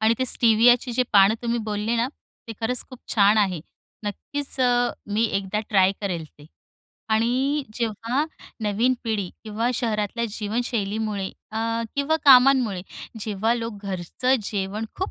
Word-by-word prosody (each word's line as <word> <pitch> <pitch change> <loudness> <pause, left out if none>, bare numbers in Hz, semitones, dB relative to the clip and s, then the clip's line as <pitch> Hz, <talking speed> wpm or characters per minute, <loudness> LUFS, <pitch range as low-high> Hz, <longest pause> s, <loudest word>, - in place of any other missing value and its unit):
आणि 220 +1 +4
ते 260 - +1
स्टिवियाची 240 +2 +4
जे 250 +2 +2
पानं 200 +1 +6
तुम्ही 235 0 0
बोलले 210 +3 -1
ना, 235 +2 +1 0.4
ते - - -4
खरंच 245 +2 -1
खूप 255 - -10 0.2
छान 205 0 +5
आहे. 190 -5 +1 0.4
नक्कीच 275 +8 -5
अ, 245 -1 +3 0.2
मी 210 +2 +1
एकदा 195 +1 -1
ट्राय 190 -2 +4
करेल 180 -6 -3
ते. 145 - -14 0.7
आणि 260 +6 +1
जेव्हा 230 +5 -1 0.4
नवीन 220 +5 +2
पिढी 215 -5 -1 0.2
किंवा 220 +3 -1
शहरातल्या 225 -1 -1
जीवनशैलीमुळे 215 -2 -2 0.3
अ, 220 - -2 0.4
किंवा 280 +3 +1
कामांमुळे 255 -7 +6 0.4
जेव्हा 215 +2 0
लोकं 230 -2 -4
घरचं 195 +8 0
जेवण 200 +1 -3
खूप 380 - -3
225 Hz, 140 wpm, -24 LUFS, 205-245 Hz, 0.7 s, पानं